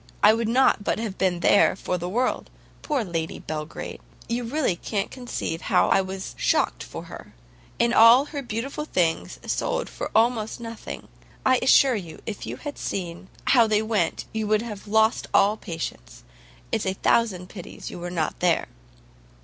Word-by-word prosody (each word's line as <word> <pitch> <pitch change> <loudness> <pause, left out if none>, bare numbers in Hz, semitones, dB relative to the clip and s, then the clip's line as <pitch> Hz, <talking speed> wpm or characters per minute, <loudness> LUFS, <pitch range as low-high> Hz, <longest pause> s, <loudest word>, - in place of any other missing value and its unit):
I 210 - +8
would 225 0 -1
not 245 -2 +3
but - - 0
have 220 -3 -4
been 180 -2 +1
there 200 - +5
for 180 - -3
the 175 +1 -4
world. 245 +6 -1 0.3
Poor 290 -6 0
Lady 165 -4 -3
Belgrade! 155 0 -6 0.3
you 240 +1 -1
really 250 - 0
can't 200 +3 -3
conceive 240 -9 -4
how - - +4
I 195 - +4
was 190 0 -6
shocked - - +1
for - - -7
her. - - -11 0.6
All 235 +5 +8
her 295 -1 -5
beautiful 260 +5 -4
things 170 - 0
sold - - -1
for - - -5
almost 225 -1 +2
nothing. 230 -1 -7 0.4
I 260 -1 +4
assure 265 +1 +6
you, 170 -7 -7
if 215 -3 -5
you - - -5
had 290 -1 -7
seen 180 -1 -4 0.2
how 235 -4 +5
they 215 0 +2
went, 220 -1 0
you 220 -1 -2
would 215 +1 +2
have 210 -3 -8
lost 220 +2 +2
all 205 +2 +5
patience. 160 - -7 0.5
It's 205 - 0
a 190 - +1
thousand 190 -3 +1
pities 180 -4 -9
you - - -8
were 175 +1 -5
not 165 -3 -2
there." 175 -1 +2
215 Hz, 170 wpm, -25 LUFS, 180-235 Hz, 0.6 s, I